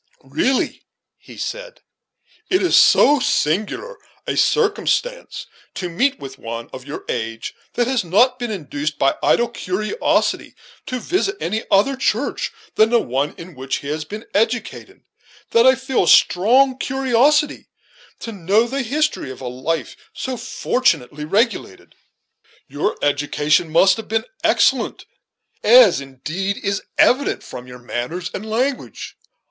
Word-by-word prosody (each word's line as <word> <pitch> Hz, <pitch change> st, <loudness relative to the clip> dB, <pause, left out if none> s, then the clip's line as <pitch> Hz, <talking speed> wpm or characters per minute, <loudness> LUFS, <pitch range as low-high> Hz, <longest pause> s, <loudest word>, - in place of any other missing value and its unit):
"Really," 150 Hz, -, -1 dB, 0.4 s
he -, -, -14 dB
said, -, -, -6 dB, 0.7 s
"it 370 Hz, +1 st, +2 dB
is 360 Hz, -, +3 dB
so 290 Hz, 0 st, +6 dB
singular 215 Hz, -, -1 dB, 0.3 s
a -, -, -2 dB
circumstance 470 Hz, +3 st, 0 dB, 0.3 s
to 180 Hz, -, -4 dB
meet 250 Hz, +11 st, +1 dB
with 135 Hz, -1 st, -9 dB
one 115 Hz, 0 st, -7 dB
of 130 Hz, +1 st, -9 dB
your 145 Hz, -, -7 dB
age, 115 Hz, -1 st, -4 dB, 0.2 s
that 240 Hz, -, +1 dB
has 250 Hz, -3 st, 0 dB
not 245 Hz, +9 st, +3 dB
been 240 Hz, -1 st, -3 dB
induced 150 Hz, -6 st, -4 dB
by 135 Hz, -, +3 dB
idle 240 Hz, -, +3 dB
curiosity 215 Hz, -, -1 dB, 0.3 s
to 255 Hz, -1 st, -3 dB
visit 380 Hz, -, -1 dB
any 215 Hz, +5 st, -2 dB
other 210 Hz, +8 st, +3 dB
church 260 Hz, 0 st, -1 dB, 0.3 s
than 220 Hz, +1 st, +5 dB
the 235 Hz, 0 st, +4 dB
one 135 Hz, -, -2 dB
in 170 Hz, +1 st, -10 dB
which 130 Hz, 0 st, -3 dB
he 140 Hz, -, -6 dB
has 155 Hz, +1 st, -2 dB
been 210 Hz, +6 st, -8 dB
educated, 225 Hz, +3 st, -2 dB, 0.5 s
that 230 Hz, +2 st, +5 dB
I 260 Hz, -, +6 dB
feel 265 Hz, -6 st, 0 dB
a -, -, -5 dB
strong 255 Hz, +12 st, +4 dB
curiosity 270 Hz, +3 st, +1 dB, 0.5 s
to 230 Hz, -, -6 dB
know 200 Hz, +3 st, +2 dB
the 270 Hz, +3 st, -2 dB
history 290 Hz, -, -1 dB
of 130 Hz, -, -9 dB
a 130 Hz, -, -6 dB
life 130 Hz, +6 st, -3 dB, 0.2 s
so 260 Hz, -1 st, -4 dB
fortunately 185 Hz, -, -1 dB
regulated. 205 Hz, -, -1 dB, 0.7 s
Your 145 Hz, +2 st, -2 dB
education 145 Hz, +3 st, +1 dB
must 190 Hz, +4 st, +4 dB
have 225 Hz, -, -7 dB
been 225 Hz, +1 st, -1 dB, 0.2 s
excellent; -, -, +2 dB, 0.6 s
as -, -, +6 dB
indeed 155 Hz, +9 st, -4 dB
is 200 Hz, 0 st, -2 dB, 0.2 s
evident 270 Hz, +3 st, +3 dB
from 125 Hz, 0 st, -9 dB
your 125 Hz, 0 st, -10 dB
manners 125 Hz, +8 st, -5 dB
and 195 Hz, -, -5 dB
language. 255 Hz, +5 st, -3 dB
215 Hz, 140 wpm, -20 LUFS, -, 0.7 s, so